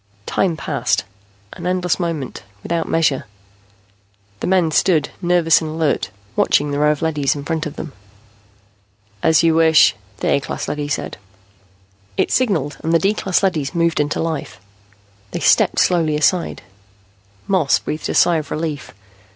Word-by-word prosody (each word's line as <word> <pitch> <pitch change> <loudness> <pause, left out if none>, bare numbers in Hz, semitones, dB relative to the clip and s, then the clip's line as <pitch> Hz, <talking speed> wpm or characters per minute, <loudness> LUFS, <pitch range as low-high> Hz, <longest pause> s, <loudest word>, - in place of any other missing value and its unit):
Time 175 -4 0
passed, - - -1 0.5
an 175 - -6
endless 180 -1 0
moment, 165 -7 -3 0.2
without 165 -1 -2
measure. 150 -7 +1 1.1
The - - -3
men 180 -3 +2
stood, 155 -2 +2
nervous 175 -2 +3
and 160 - -4
alert, 155 - -1 0.3
watching 145 0 +2
the 145 - -1
row 150 0 +4
of 150 +1 -3
leadys 150 -4 0
in 140 -1 -7
front 160 -1 -2
of 150 - -9
them. 155 - -7 1.3
"As 160 +1 +4
you 165 -1 +4
wish," 160 -9 +5 0.2
the - - -3
A - - +3
class - - -5
leady 150 -1 -3
said. 145 - -3 1.0
It - - +1
signaled 170 - 0
and 165 - 0
the - - +6
D 195 +5 +1
class 195 -2 0
leadys 165 -5 0
moved 170 -2 +1
into 150 0 0
life. 160 -3 -4 0.7
They - - -4
stepped - - +3
slowly 165 -4 +2
aside. 170 +4 0 0.8
Moss 185 -8 +3
breathed 155 - -5
a - - -2
sigh 170 -2 +4
of 155 -2 -5
relief. 150 - -4
160 Hz, 155 wpm, -19 LUFS, 150-175 Hz, 1.3 s, the